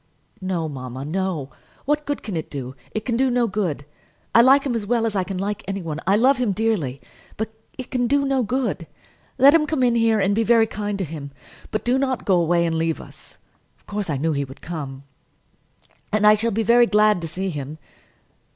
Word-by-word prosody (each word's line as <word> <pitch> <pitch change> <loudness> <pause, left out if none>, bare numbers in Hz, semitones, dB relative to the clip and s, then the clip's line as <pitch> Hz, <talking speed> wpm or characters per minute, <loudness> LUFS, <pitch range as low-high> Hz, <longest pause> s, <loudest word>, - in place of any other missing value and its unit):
"No, 180 -4 -2
mamma, 130 -2 -6
no; 165 -4 -2 0.3
what 295 +1 0
good 290 - -3
can 205 -6 -5
it 160 - -4
do? 130 -3 -6 0.2
It 215 - -2
can 235 -3 0
do 265 +1 +2
no 245 -1 +2
good. 190 -9 -2 0.5
I 235 - +8
like 270 +3 +6
him 265 - 0
as 220 -3 -3
well 235 0 +1
as 220 -2 -2
I 190 - +1
can 190 0 -5
like 200 +2 -3
any 195 -1 -3
one. 155 -2 -4
I 195 - +5
love 260 +6 +4
him 240 -5 0
dearly. 185 - -1 0.4
But 220 0 -3 0.3
it 260 - -8
can 245 -2 +1
do 280 +2 +2
no 270 -1 +1
good. 220 -7 -2 0.5
Let 275 +3 +7
him 315 -2 +3
come 300 -4 0
in 245 -1 +3
here, 225 -2 +3
and 195 0 +2
be 220 - +2
very 230 0 +4
kind 205 -2 -4
to 190 - -2
him; 150 -2 -7 0.4
but 215 - -3
do 250 +2 +2
not 265 -2 -1
go 185 -3 +3
away 170 +1 +2
and 165 -1 0
leave 165 -1 0
us. - - -14 0.4
Of - - -35
course 205 -3 -4
I 145 - 0
knew 160 +4 0
he 140 -2 -1
would 135 0 -11
come, 140 -5 -6 1.1
and 215 0 +2
I 210 - +8
shall 220 +2 +1
be 225 +1 0
very 235 +2 +5
glad 210 -3 +3
to 165 - -4
see 190 +4 -3
him." 145 0 -6
205 Hz, 225 wpm, -22 LUFS, 165-235 Hz, 1.1 s, I